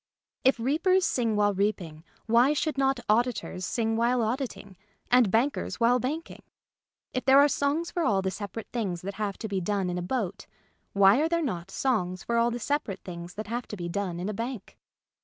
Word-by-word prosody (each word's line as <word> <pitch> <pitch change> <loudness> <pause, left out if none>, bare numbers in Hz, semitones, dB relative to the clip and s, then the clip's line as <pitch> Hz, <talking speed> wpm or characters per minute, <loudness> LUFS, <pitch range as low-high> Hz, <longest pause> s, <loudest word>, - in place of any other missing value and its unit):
If 260 -1 +4
reapers 345 +9 +2
sing 230 -4 0
while 205 0 +3
reaping, 185 -6 -2 0.2
why 240 +5 +4
should 305 +1 -1
not 270 -1 +1
auditors 215 -5 0
sing 225 -2 0
while 235 +1 +2
auditing 225 -4 -4 0.4
and 245 -4 +5
bank 240 +8 +2
ers - - -5
while 245 +2 +4
banking? 300 +7 -4 0.7
If 255 - -2
there 265 +1 +6
are 285 +1 +7
songs 295 +4 0
for 350 - -2
all 195 -8 +2
the 190 - -1
separate 205 +2 -7
things 195 -8 -2
that 200 +1 -4
have 200 -2 -2
to 220 - -5
be 195 -2 -2
done 195 0 -1
in 180 - -2
a - - -3
boat, 205 0 -3 0.5
why 200 +6 +5
are 320 - +1
there 335 0 +1
not 180 - -3
songs 185 -8 -1
for 235 - -1
all 235 +1 +3
the 240 - -3
separate 245 -5 -2
things 175 -1 -8
that 215 - -5
have 235 +3 -4
to 210 - -7
be 175 -1 -4
done 180 -2 -3
in 180 - -3
a 210 - -2
bank 230 0 -5
225 Hz, 205 wpm, -27 LUFS, 195-260 Hz, 0.7 s, are